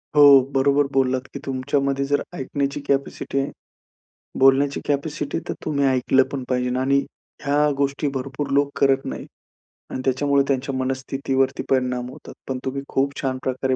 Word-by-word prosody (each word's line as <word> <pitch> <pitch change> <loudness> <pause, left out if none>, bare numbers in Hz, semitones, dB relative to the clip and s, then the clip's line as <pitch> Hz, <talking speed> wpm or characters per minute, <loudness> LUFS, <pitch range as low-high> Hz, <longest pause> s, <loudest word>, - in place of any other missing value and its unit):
हो, 145 -2 +9
बरोबर 140 +1 +3
बोललात 130 -1 +1
की 140 - -5
तुमच्यामध्ये 140 +1 0
जर 145 +1 +1
ऐकण्याची 140 -2 -2
कॅपॅसिटी 140 0 -1
आहे 135 - -2 0.9
बोलण्याची 135 +1 +4
कॅपॅसिटी, 145 +1 -1
तर - - -1
तुम्ही 140 -3 +1
ऐकलं 130 0 +3
पण 135 -2 -3
पाहिजे 125 -1 0
आणि 135 +2 +2 0.5
ह्या 145 +1 +3
गोष्टी 140 +1 0
भरपूर 135 +2 -4
लोक 140 0 +3
करत 135 -1 +3
नाहीत - - -6 0.7
आणि 130 - -3
त्याच्यामुळे 140 +1 +2
त्यांच्या 135 0 -1
मनस्थितीवरती 135 0 -1
परिणाम 125 -1 0
होतात. - - -12
पण 130 - -2
तुम्ही 135 +1 -2
खूप 135 +1 +1
छान 130 -2 -1
प्रकारे 130 0 0
135 Hz, 150 wpm, -22 LUFS, 130-140 Hz, 0.9 s, हो